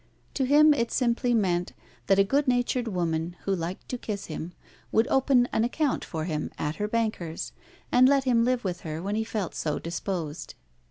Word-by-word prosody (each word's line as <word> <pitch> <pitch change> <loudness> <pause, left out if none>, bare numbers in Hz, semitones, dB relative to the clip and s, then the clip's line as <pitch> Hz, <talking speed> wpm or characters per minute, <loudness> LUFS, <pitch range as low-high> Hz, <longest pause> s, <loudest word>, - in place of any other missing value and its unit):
To 270 - 0
him 300 +3 +6
it 235 -5 -1
simply 245 -1 +1
meant 180 -5 0 0.3
that 195 - +4
a 195 - +6
good 275 +8 +1
natured 245 -1 +1
woman, 170 -3 -1
who 195 - 0
liked 175 +1 -5
to 250 - -3
kiss 205 -4 -4
him, 160 +2 -6 0.4
would 225 +1 +3
open 265 -2 +4
an 220 - +2
account 275 +3 0
for 160 -2 -4
him 155 -3 -2
at 150 +1 -3
her 210 - -1
banker's, 215 -7 -2 0.4
and 255 +1 +6
let 280 -1 +3
him 240 -3 +3
live 250 0 +1
with 180 -3 -3
her 155 -1 -5
when 200 +2 -2
he 220 +1 0
felt 215 -5 -3
so 150 -2 -2
disposed. 170 -2 -4
215 Hz, 195 wpm, -27 LUFS, 175-245 Hz, 0.4 s, him